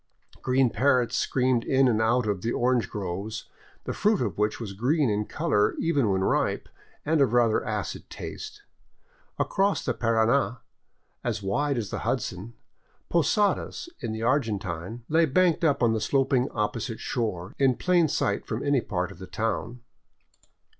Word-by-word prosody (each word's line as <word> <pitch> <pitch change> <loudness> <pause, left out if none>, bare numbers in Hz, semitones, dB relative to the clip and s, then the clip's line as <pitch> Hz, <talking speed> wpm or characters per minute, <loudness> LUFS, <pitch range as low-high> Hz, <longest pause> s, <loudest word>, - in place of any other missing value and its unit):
Green 130 -1 +2
parrots 130 -2 +2
screamed 125 -2 +1
in 135 0 +3
and 110 -3 +2
out 115 +2 +2
of 100 -3 -1
the 115 - -1
orange 120 -5 +1
groves, 100 +2 -4 0.4
the - - -3
fruit 210 -1 +2
of - - -1
which 105 +1 0
was 105 -5 -5
green 130 - +1
in 105 +1 0
color 105 -10 +1
even 145 -9 +1
when 95 -1 +1
ripe - - 0 0.4
and 155 0 +2
of 125 -4 +3
rather 120 -3 +3
acid - - -4
taste. - - -8 0.7
Across 195 +1 +1
the - - +1
Parana, 115 +2 +1 0.6
as 100 - -2
wide 140 +8 0
as 110 -4 -3
the - - -3
Hudson, 105 +6 -3 0.5
Posadas, 205 - +1
in 110 - -4
the 110 +1 -4
Argentine, 110 - -1
lay 165 +1 +3
banked 175 +4 +2
up 140 -5 +2
on 115 -1 +4
the 110 - -1
sloping 135 0 +2
opposite 110 +2 -3
shore, 95 -7 -3
in 135 -2 +4
plain 175 0 +3
sight 155 - -1
from - - -3
any 140 -3 +3
part 90 -4 -3
of - - -13
the 95 - -8
town. 110 +5 -3
120 Hz, 160 wpm, -26 LUFS, 105-140 Hz, 0.7 s, on